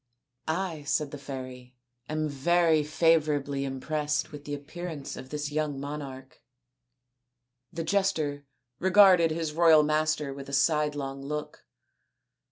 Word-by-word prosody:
" 125 - -47 0.2
I," 160 -4 -8
said 145 0 -1
the 145 - -7
fairy, 130 -2 -8 0.2
" 120 -1 -43
am 155 0 -1
very 160 +3 +3
favourably 150 -3 +1
im 135 -1 -4
pressed 150 +1 -1
with 145 -1 -10
the 145 0 -3
appearaiKe 155 0 -7
of 130 - -9
this 150 0 -4
young 150 -2 -1
monarch." 140 -2 -7 1.3
The 165 - -4
jester 160 -6 0 0.3
regarded 190 -3 +6
his 160 -1 -3
royal 160 -2 +6
master 155 -1 0
with 140 0 -9
a - - -8
sidelong 140 -1 0
look. 150 +2 -6
150 Hz, 135 wpm, -28 LUFS, 140-155 Hz, 1.3 s, regarded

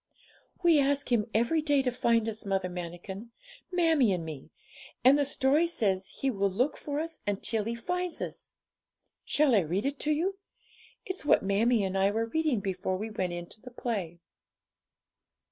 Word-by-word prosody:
'We 335 -3 +6
ask 280 -1 +1
Him 225 -3 +2
every 240 +9 +2
day 290 -3 +2
to 250 - +1
find 230 -2 +2
us, 220 -1 -4
Mother 195 -2 -1
Manikin 180 +5 -7 0.4
mammie 325 - +3
and 170 -3 -3
me; 155 -2 -8 0.6
and 265 +2 +8
the 290 -1 +2
story 285 +4 +2
says 195 - 0
He 275 - +2
will 200 -3 0
look 245 +10 0
for 290 0 -4
us 325 +1 -4
until 205 +1 0
He 230 +1 -2
finds 355 +8 -2
us. - - -6 0.7
Shall 295 -3 +3
I 215 - +6
read 180 +7 -2
it 280 0 -2
to 305 - 0
you? 370 +6 0 0.7
It's 375 0 -3
what 295 - +4
mammie 210 +3 +2
and 190 0 -2
I 195 +1 +3
were 225 +2 0
reading 285 -2 0
before 185 -1 -2
we 220 +3 -5
went 185 -4 -2
in 175 0 -5
to 215 - -10
the 250 - -10
play.' 205 -9 -4
230 Hz, 180 wpm, -29 LUFS, 195-290 Hz, 0.7 s, and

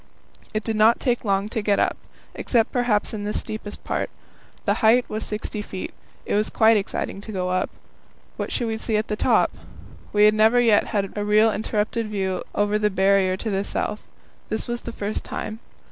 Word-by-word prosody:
It 215 0 -2
did 225 0 -2
not 220 +2 +5
take 245 -3 0
long 200 -1 +1
to 220 -1 -2
get 205 -1 +2
up, - - +2 0.4
except 230 -3 +1
perhaps 240 -5 +1
in 210 -1 -4
the 210 +1 -2
steepest 215 -1 -5
part. - - -2 0.6
The - - +3
height 235 +3 +5
was 215 +1 -4
60 210 0 -4
feet. 190 -2 -6 0.3
It - - -2
was 210 +1 +2
quite 225 0 +5
exciting 200 -1 -2
to 215 - -8
go 185 -2 -2
up; 185 0 0 0.7
what - - -4
should 240 - -1
we 220 -1 -2
see 220 -2 0
at 215 - -2
the 210 - 0
top? - - +3 0.6
We 210 0 +5
had 210 - +6
never 220 +3 +5
yet 230 -4 +4
had 200 -2 -2
a 205 - -1
real 210 +2 +4
uninterrupted 215 +1 -1
view 190 -3 -1
over 205 +1 +2
the 210 0 +2
Barrier 190 -1 +3
to 220 +2 -3
the 195 0 0
south; 210 +1 -3 0.4
this 220 - -3
was 240 0 -3
the 235 - -6
first 210 -1 -4
time. 215 +1 -5
210 Hz, 200 wpm, -23 LUFS, 205-220 Hz, 0.7 s, had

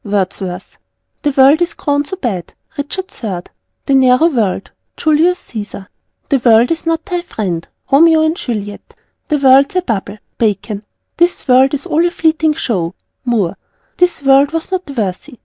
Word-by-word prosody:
Wordsworth. 190 -2 -3 0.4
"The 290 - +1
World 275 +5 +6
is 345 - 0
grown 285 -1 -1
so 380 - -6
bad." 205 - -4 0.2
Richard 370 +7 -5
III. 185 -5 -5 0.3
"The 275 - +1
narrow 265 +4 +5
World." 215 - -1 0.3
Julius 325 +4 +2
Cæsar. 205 -3 -8 0.4
"The 275 - +2
World 235 +1 +4
is 330 0 -3
not 325 -1 0
thy 355 -3 -2
friend." 185 - -4 0.2
Romeo 320 +3 +5
and 315 +1 +1
Juliet. 205 - -6 0.3
"The 300 - +1
World's 275 +2 +4
a 365 - +1
bubble." 205 - -3 0.2
Bacon. 210 -1 -1 0.3
"This 345 -1 +1
World 265 +2 +4
is 280 - -6
all 320 +3 +1
a 350 - +2
fleeting 320 -2 +1
show." 180 -10 -2 0.3
Moore. 205 -7 0 0.4
"The 360 0 +4 0.2
World 275 +2 +5
was 330 +3 -3
not 370 -4 -3
worthy." 235 +2 -4
270 Hz, 160 wpm, -15 LUFS, 210-320 Hz, 0.4 s, World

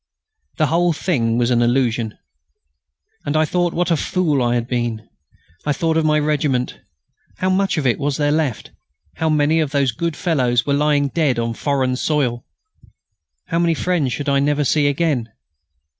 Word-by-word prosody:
The 155 - +3
whole 170 +3 +2
thing 120 -9 0
was 120 0 +1
an 120 -1 +3
illusion. 120 -2 0 1.1
And 145 - -1
I 155 - +3
thought 175 +2 0
what 175 +1 0
a - - +4
fool 155 -3 0
I 120 0 +1
had 120 -1 -1
been. 120 -3 -3 0.6
I 145 - 0
thought 165 0 0
of 160 - +2
my 150 0 +3
regiment. 145 -4 0 0.6
How 185 0 0
much 195 -1 +1
of 150 - -1
it 125 - +1
was 145 -1 -1
there 145 -1 +1
left? 150 -7 -1 0.5
How 160 - 0
many 155 +1 +2
of 155 -3 0
those 140 -2 +1
good 165 +7 -3
fellows 125 -9 +1
were 140 - 0
lying 145 -1 +2
dead 150 -5 0
on 115 0 -1
foreign 130 0 0
soil? 130 -6 0 1.1
How 165 -1 0
many 170 -1 +2
friends 165 -6 0
should 145 +4 -4
I 140 -1 +2
never 145 +1 +1
see 145 +1 +2
again? 140 -6 0
145 Hz, 175 wpm, -19 LUFS, 125-160 Hz, 1.1 s, a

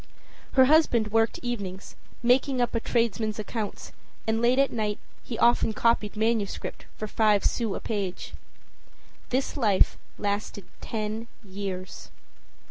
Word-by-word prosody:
Her 260 -1 +7
husband 260 -7 +4
worked 225 0 +2
evenings, 200 -6 -5 0.3
making 255 +2 +3
up 240 -1 +1
a 230 - +1
tradesman's 225 -2 0
accounts, 215 0 -5 0.3
and 225 +1 0
late 245 +2 +3
at 275 0 +3
night 210 -3 -1 0.3
he 230 - -5
often 235 -2 +4
copied 225 -2 +1
manuscript 220 -2 -1
for 215 - -4
five 210 -2 +3
sous 225 -5 0
a - - -3
page. 200 -4 -4 1.0
This 260 +2 -1
life 215 -9 +3 0.2
lasted 205 -1 -3 0.2
ten 220 +1 -3 0.2
years. 190 -2 -6
220 Hz, 130 wpm, -27 LUFS, 205-240 Hz, 1.0 s, Her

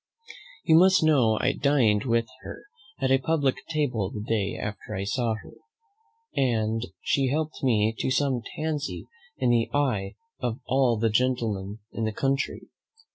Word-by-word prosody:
You 160 -1 +5
must 185 -1 +5
know 130 -9 +4
I 130 - +2
dined 130 -7 +2
with 115 -2 +2 0.2
her - - -9 0.4
at 130 -2 +1
a 135 - +5
publick 140 -2 +1
table 125 - 0
the 105 0 -6
day 105 -3 0
after 105 +1 -5
I 95 - -3
first 100 - -3
saw 120 -3 0
her, 105 - -12 0.8
and 115 -3 0 0.2
she 135 -1 +2
helped 155 +3 -2
me 110 -4 +2
to - - 0
some 130 -1 +1
tansy 155 -2 -3 0.3
in 120 - +2
the 115 -1 +2
eye 115 -9 0 0.2
of 120 0 -2
all 130 -3 +2
the 110 +1 +1
gentlemen 110 -4 -1
in 115 - -3
the 110 - -2
country. 135 +5 -1
125 Hz, 160 wpm, -26 LUFS, 110-140 Hz, 0.8 s, You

